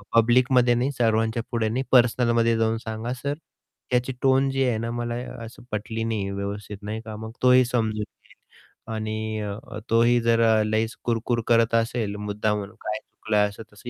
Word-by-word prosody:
पब्लिकमध्ये 120 +1 +4
नाही 125 +4 0
सर्वांच्या 115 0 +1
पुढे 115 -3 0
नाही 125 +4 -1
पर्सनलमध्ये 120 -2 +4
जाऊन 115 0 +1
सांगा, 110 +1 -5
"सर, 140 +3 -3 0.6
त्याची 125 +1 +1
टोन 135 0 +3
जी 135 0 0
आहे 120 -3 +1
ना, 115 +1 -3
मला 120 0 -3 0.3
असं 115 - -12
पटली 110 +2 -3
नाही 110 -3 -2
व्यवस्थित." 100 +1 -5
नाही 110 +2 -4
का, 110 -1 -6
मग 110 +1 -7
तोही 125 0 +6
समजून 110 -3 -1
घेईल - - -17 0.6
आणि 110 0 -3
अ, 105 +3 -6
तोही 120 +2 +4
जर 115 0 +3 0.2
लईच 110 +1 0
कुरकुर 120 0 0
करत 115 -1 +3
असेल 115 -2 0
मुद्दामून, 105 0 -2
काय 105 0 -3
चुकलं 105 -1 0
असं 105 +2 -10
तसं 105 +4 -10
115 Hz, 165 wpm, -25 LUFS, 110-120 Hz, 0.6 s, तोही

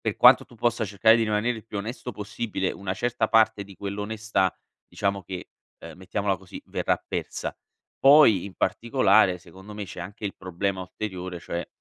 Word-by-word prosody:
per - - -2
quanto - - +7
tu - - -18
possa 120 0 0
cercare 105 +3 +4
di 115 - +1
rimanere 110 +3 0
il 110 - -10
più 105 - -5
onesto 120 +3 -5
possibile, 105 -1 -3
una 100 -1 -4
certa 120 +2 0
parte 110 -2 +3
di 100 -1 -13
quell'onestà, 105 0 -1 0.3
diciamo 100 -1 -1
che, 90 -1 -7 0.3
uhm, - - -10
mettiamola 100 +1 -1
così, 95 -1 -11
verrà - - 0
persa. - - -4 0.4
Poi 135 - +7
in 100 - -7
particolare, 110 -6 +3
secondo 95 +4 -13
me, 105 -1 -5
c'è 90 - -8
anche 100 +4 -8
il 100 - -5
problema 95 +1 -3
ulteriore, 90 -2 -6
cioè 85 0 -4
100 Hz, 175 wpm, -26 LUFS, 95-110 Hz, 0.4 s, quanto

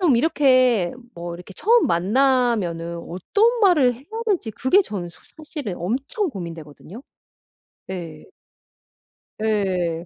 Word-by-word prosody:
좀 320 -10 +4
이렇게 255 - +3 0.2
뭐 170 0 -6
이렇게 180 +3 -11
처음 465 - +3
만나면은 195 -4 +1
어떤 425 - +1
말을 305 - +4
해야 250 +4 -16 0.2
될지 360 - 0
그게 260 - +3
저는 200 - -4
소 170 - -18 0.2
사실은 295 - -6
엄청 280 - -2
고민되거든요. 170 - -9 0.8
네. 170 -5 -7 1.2
예. 185 -6 0
220 Hz, 240 characters per minute, -22 LUFS, 175-280 Hz, 1.2 s, 좀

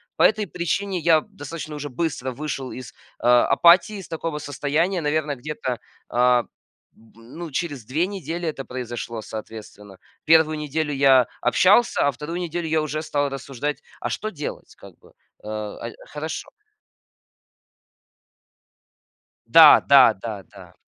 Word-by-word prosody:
По - - +2
этой 215 -1 +3
причине 180 +3 -2
я 160 -1 +4
достаточно 155 -5 -8
уже 145 0 -6
быстро 130 -2 -3
вышел 135 -1 -5
из, 130 -2 -9 0.3
э, - - -8
апатии, 170 - +5
из 190 -3 -9
такого 165 -1 -4
состояния. 150 +6 -1
Наверное, 150 -1 -1
где-то, 130 -3 -5 0.3
а, 125 0 +3 0.5
б 115 0 -23
ну, 160 +9 -9
через 145 -7 -4
2 155 +8 0
недели 175 -3 -5
это 135 -4 -4
произошло, 120 -2 -6
соответственно. 105 -3 -10 0.3
1 155 0 +4
неделю 150 0 -2
я 135 -2 +5 0.2
общался, 195 - +4
а - - +2
2 150 +6 -6
неделю 170 -1 -3
я 155 0 +1
уже 155 0 -3
стал 145 -2 -1
рассуждать, 135 +1 -5 0.2
а - - -3
что 215 - -3
делать, 150 -7 -7
как - - -14
бы, - - -21 0.3
э, - - -11
а, 110 +1 -5
и - - -12
хорошо. 155 +2 -6 3.0
Да, - - +8
да, - - +7
да, - - -7
да. - - -16
150 Hz, 140 wpm, -23 LUFS, 125-165 Hz, 3.0 s, Да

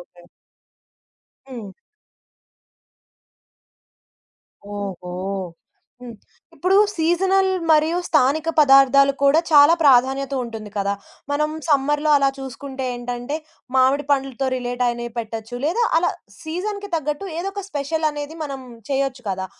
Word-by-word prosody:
Okay. 175 0 -17 1.3
హ్మ్. 220 -7 -8 3.0
ఓహో! 195 -3 -6 0.9
హ్మ్. 245 -2 -9 0.4
ఇప్పుడు 375 +2 +2 0.2
సీజనల్ 380 +4 +2 0.2
మరియు 315 +2 +4
స్థానిక 305 +2 +2
పదార్థాలు 275 0 +6
కూడా 285 +4 +5
చాలా 295 +2 +7
ప్రాధాన్యత 270 0 +3
ఉంటుంది 220 -3 -8
కదా! 200 0 0 0.4
మనం 300 +1 0 0.2
సమ్మర్‌లో 295 +1 +2
అలా 275 - +3
చూసుకుంటే 265 0 -7
ఏంటంటే, 245 +4 -4 0.4
మామిడి 265 +3 +3
పండ్లతో 270 -1 0
రిలేట్ 245 0 -2
అయినవి 240 -1 -4
పెట్టొచ్చు 225 +1 -5
లేదా 360 +10 +1 0.2
అలా 350 - +1 0.3
సీజన్‌కి 405 +5 -4
తగ్గట్టు 305 +4 -2
ఏదో 390 +3 -3
ఒక 400 -1 -6
స్పెషల్ 310 +2 -1
అనేది 295 +2 -7
మనం 270 -2 -6 0.3
చేయొచ్చు 270 -2 -1
కదా! 190 0 -3
275 Hz, 105 wpm, -21 LUFS, 245-310 Hz, 3.0 s, చాలా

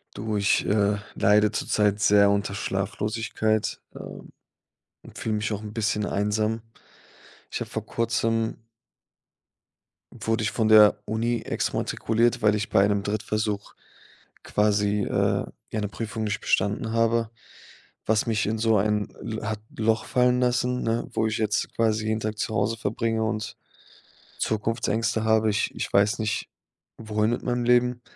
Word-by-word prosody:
Du, 110 0 -3
ich, 100 0 +2
äh, 105 0 +2 0.2
leide 105 +1 +3
zurzeit 105 -1 +1
sehr 100 -1 +5
unter 100 -1 0
Schlaflosigkeit, 110 +2 -1
ähm, - - -10 0.7
und - - -13
fühle 110 -1 -1
mich 105 +1 -2
auch 105 0 -4
'n 105 -1 -7
bisschen 105 -2 -1
einsam. 110 +2 0 0.9
Ich - - -4
habe - - -4
vor - - -4
Kurzem 115 -1 -1 1.6
wurde 115 0 -2
ich 105 - -1
von 110 -2 +1
der 105 -1 +7
Uni 115 +2 -1
exmatrikuliert, 115 +1 0
weil 105 -1 +4
ich 105 -1 -2
bei 95 - +4
einem 100 0 +2
Drittversuch 105 0 -2 0.7
quasi, 105 0 +1
äh, - - +1 0.3
ja, 110 - -2
'ne 105 - -1
Prüfung 110 +1 -5
nicht 110 +2 -2
bestanden 105 +3 0
habe, 115 0 +1 0.8
was 110 0 +2
mich 110 -2 0
in 110 - -1
so 110 -1 +3
ein 105 +1 0
L 110 -1 -5
hat 110 -1 -2 0.2
Loch 110 0 +1
fallen 125 0 +2
lassen, 125 0 +1
ne, 115 +1 -1
wo 110 - +1
ich 110 - -2
jetzt 110 0 -1
quasi 110 -1 +1
jeden 110 0 0
Tag 110 0 -3
zu 110 - -2
Hause 115 0 0
verbringe 115 +1 -1
und 110 -1 -3 0.8
Zukunftsängste 110 0 -1
habe. 110 0 +3
Ich 100 - 0
ich - - -4
weiß 100 +1 +3
nicht, 110 -1 -2 0.5
wohin 110 -1 0
mit 120 - -2
meinem 120 -1 -1
Leben. 125 0 +2
110 Hz, 150 wpm, -25 LUFS, 105-115 Hz, 1.6 s, der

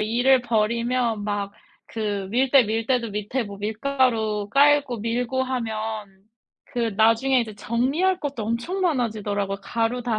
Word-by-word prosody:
일을 245 +4 +3
벌이면 235 0 0
막 205 -1 -2 0.4
그 205 -3 -3
밀대 260 +1 +4
밀 220 +2 -1
때도 240 -2 0
밑에 210 +5 -2
뭐 200 -1 -9
밀가루 220 -2 0
깔고 280 -2 +4
밀고 245 +4 -1
하면 220 -5 -4 0.4
그 245 - -5 0.2
나중에 230 +4 +4
이제 220 -3 -5
정리할 275 - 0
것도 275 -6 -4
엄청 235 - -2
많아지더라고요. 215 - -1
가루 235 +1 -1
다 230 -3 -1
230 Hz, 275 characters per minute, -24 LUFS, 215-255 Hz, 0.4 s, 밀대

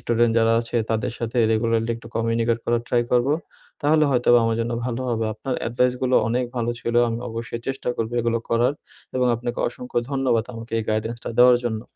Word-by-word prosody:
Student 120 -1 +2
যারা 115 0 +3
আছে 120 +1 -4
তাদের 115 +2 -1
সাথে 115 +1 -2
রেগুলারলি 115 +1 +1
একটু - - -12
কমিউনিকেট 115 0 +1
করার 120 0 +1
ট্রাই 120 -1 +2
করবো, 125 +4 +3 0.5
তাহলে 155 +1 +4
হয়তোবা 120 -1 +4
আমার 115 0 +1
জন্য 120 +1 -2
ভালো 125 0 -2
হবে। 115 -1 0
আপনার 130 -2 -4
অ্যাডভাইসগুলো 125 +2 +1
অনেক 125 +2 0
ভালো 120 0 0
ছিল। 120 - -3
আমি 115 0 -2
অবশ্যই 115 +1 -5
চেষ্টা 135 -1 -3
করবো 115 +1 -2
এগুলো 115 0 0
করার 120 +4 +2 0.4
এবং 125 - +2
আপনাকে 120 +1 -4
অসংখ্য 125 0 -4
ধন্যবাদ 130 -4 +1
আমাকে 115 0 -9
এই 110 - -2
গাইডেন্সটা 110 +2 -2
দেওয়ার 125 0 +7
জন্য। 110 -2 -2
120 Hz, 185 wpm, -23 LUFS, 115-125 Hz, 0.5 s, দেওয়ার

